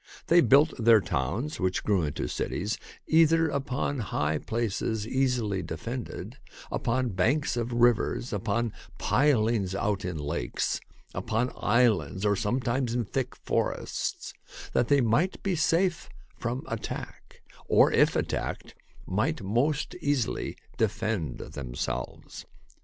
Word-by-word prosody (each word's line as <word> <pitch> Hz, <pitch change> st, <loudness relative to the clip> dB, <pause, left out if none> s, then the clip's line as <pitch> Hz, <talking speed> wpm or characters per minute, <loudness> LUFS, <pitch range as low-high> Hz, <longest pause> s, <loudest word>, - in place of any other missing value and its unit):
They 170 Hz, +1 st, +7 dB
built 140 Hz, +5 st, +5 dB
their 115 Hz, -1 st, +7 dB
towns, 95 Hz, -, -2 dB
which 95 Hz, 0 st, 0 dB
grew 100 Hz, -4 st, +2 dB
into 75 Hz, -5 st, -2 dB
cities, 105 Hz, -, -2 dB, 0.3 s
either 165 Hz, 0 st, +4 dB
upon 140 Hz, 0 st, -2 dB
high 75 Hz, -8 st, -1 dB
places 110 Hz, 0 st, -2 dB
easily 120 Hz, -7 st, 0 dB
defended, 115 Hz, +11 st, -6 dB, 0.3 s
upon 125 Hz, +1 st, 0 dB
banks 120 Hz, +10 st, +1 dB
of 120 Hz, 0 st, -2 dB
rivers, 120 Hz, 0 st, +2 dB
upon 115 Hz, +3 st, -1 dB, 0.2 s
pilings 115 Hz, -8 st, +2 dB
out 100 Hz, -1 st, 0 dB
in 90 Hz, -2 st, -3 dB
lakes, 70 Hz, -5 st, -2 dB, 0.3 s
upon 120 Hz, +3 st, -1 dB
islands, 110 Hz, -4 st, +2 dB
or 105 Hz, -1 st, +3 dB
sometimes 120 Hz, +4 st, 0 dB
in 120 Hz, -2 st, 0 dB
thick 130 Hz, +4 st, -3 dB
forests, -, -, -2 dB, 0.4 s
that 120 Hz, -, +2 dB
they 140 Hz, +1 st, +4 dB
might 125 Hz, +11 st, +1 dB
be 195 Hz, -2 st, +1 dB
safe 170 Hz, +3 st, +1 dB, 0.3 s
from 125 Hz, +4 st, -3 dB
attack, 115 Hz, -2 st, -6 dB, 0.2 s
or -, -, +5 dB
if -, -, +4 dB
attacked, -, -, -2 dB, 0.3 s
might -, -, -1 dB
most 130 Hz, +9 st, 0 dB
easily 145 Hz, -6 st, -1 dB, 0.2 s
defend 110 Hz, -6 st, -1 dB
themselves. 65 Hz, -3 st, -5 dB
115 Hz, 120 wpm, -28 LUFS, 100-135 Hz, 0.4 s, They